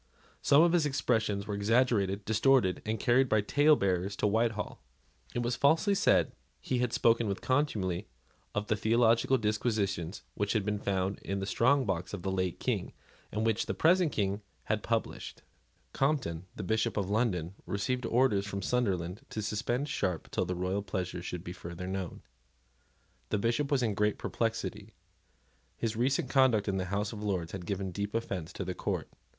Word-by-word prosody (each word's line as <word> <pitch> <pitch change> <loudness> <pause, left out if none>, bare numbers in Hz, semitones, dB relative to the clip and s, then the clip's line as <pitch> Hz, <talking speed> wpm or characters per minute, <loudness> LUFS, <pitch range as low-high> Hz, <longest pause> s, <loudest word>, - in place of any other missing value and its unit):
Some 145 +3 +6
of 170 0 +4
his 165 -4 +3
expressions 110 -7 0
were 105 - -4
exaggerated, 100 -2 +2
distorted, 110 -3 +3
and 110 +1 -1
carried 130 +1 +3
by 110 - +4
talebearers 100 - +2
to - - -1
Whitehall. 110 0 0 0.5
It 120 - 0
was 120 +1 0
falsely 160 +8 +3
said 195 - +3
that - - -33 0.3
he 125 - -1
had 125 -2 +1
spoken 115 -1 +3
with 100 -1 -2
contumely 110 - 0 0.5
of 105 0 0
the 110 - +1
theological 115 +3 +3
disquisitions 105 -5 -1
which 100 0 -1
had 105 -4 0
been 105 -1 -1
found 95 -1 -1
in 100 - -3
the 95 - -2
strong 130 +7 +3
box 95 0 -2
of 90 - -9
the 95 - -1
late 95 -2 -1
King, - - -2 0.4
and 110 +2 -1
which 115 -1 +1
the - - -2
present 175 -1 +4
King 100 0 -1 0.2
had 110 -1 -1
published. 115 +1 -3 0.5
Compton, 130 - 0
the 105 - -5
Bishop 110 +3 0
of 100 -1 -1
London, 95 -6 0
received 115 +5 -1
orders 115 -5 +2
from 100 -1 -4
Sunderland 95 -6 0
to - - -5
suspend 115 +6 -1
Sharp 90 - -2
till 95 - 0
the 90 +1 -2
royal 90 +3 -1
pleasure 90 -3 -3
should 90 -1 -5
be 90 - -6
further 85 +1 -7
known. 95 -1 -4 1.1
The - - +1
Bishop 120 +7 0
was 140 -4 +2
in 110 -3 +1
great 105 +1 +1
perplexity. - - -3 0.8
His 115 -1 -2
recent 130 +3 +1
conduct 125 -6 +3
in 95 -1 0
the 95 - -1
House 100 +4 -2
of 105 - -7
Lords 95 -6 -2
had 90 -3 -7
given 95 -1 -2
deep 100 +3 -4
offence 95 -7 -3
to 95 - -4
the 90 - -2
court. - - -3
105 Hz, 180 wpm, -31 LUFS, 95-120 Hz, 1.1 s, Some